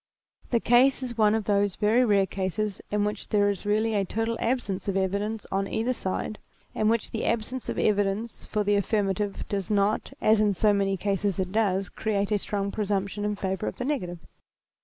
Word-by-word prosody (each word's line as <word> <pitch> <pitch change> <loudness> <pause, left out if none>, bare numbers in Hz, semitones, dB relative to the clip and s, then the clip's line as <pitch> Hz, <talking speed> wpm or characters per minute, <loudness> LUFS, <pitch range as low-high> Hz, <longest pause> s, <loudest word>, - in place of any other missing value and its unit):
The 235 - +2
case 255 +3 +4
is 245 -2 -4
one 215 -1 +4
of 220 - -1
those 200 -1 +1
very 220 +4 +3
rare 200 -4 +3
cases 195 +2 -3
in 205 0 +1
which 210 0 -4
there^ 205 -1 +3
is 200 +1 -6
really 215 +2 +2
a 200 -2 +2
total 225 +4 -2
absence 220 -6 -1
of 195 -1 0
evidence 200 +3 -1
on 195 +1 0
either 230 +5 0
side, 210 0 -3 0.3
and - - -4
in - - +5
which 230 0 0
the 225 - -3
absence 235 +2 -2
of - - -3
evidence 205 +2 0
for 210 -1 0
the 205 0 +2
affirmative 200 -1 0
cfoes~~not, 200 +1 0
asm 215 -2 +3
so 210 +3 +3
many 195 -1 +1
cases 200 0 -1
it 185 -1 -1
does, 195 -3 +1
create 205 0 -2
a 210 - +2
strong 200 0 -2
presumption 205 -1 -2
in 210 0 0
favour 190 +1 -2
of - - -3
the 250 - -4
negative. 210 -12 -2
205 Hz, 195 wpm, -27 LUFS, 195-220 Hz, 0.3 s, in